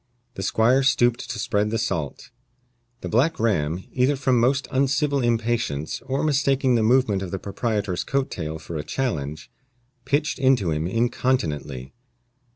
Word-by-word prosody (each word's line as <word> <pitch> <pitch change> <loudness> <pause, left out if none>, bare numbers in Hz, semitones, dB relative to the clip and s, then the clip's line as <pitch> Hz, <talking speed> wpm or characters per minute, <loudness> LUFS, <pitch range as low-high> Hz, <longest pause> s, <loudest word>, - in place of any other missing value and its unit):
The 95 - -6
squire 115 +7 +3
stooped 120 -3 +2
to - - -4
spread 105 0 0
the 115 - -1
salt. 80 - -3 0.7
The - - -4
black 145 +9 +1
ram, 90 -6 0
either 130 +3 +2
from 130 -2 +2
most 135 +4 +2
uncivil 140 +1 +1
impatience, 115 - -1
or 135 0 -1
mistaking 135 -3 +2
the 115 - +3
movement 110 -3 +3
of 95 - -4
the 95 - -3
proprietor's 100 -1 -2
coat 140 0 -1
tail 80 -2 -4
for 80 +1 -7
a 75 - -3
challenge, 75 - -3 0.5
pitched 145 +3 0
into 130 -10 +3
him 80 +2 -1
incontinently. 85 - -1
115 Hz, 150 wpm, -24 LUFS, 90-130 Hz, 0.7 s, squire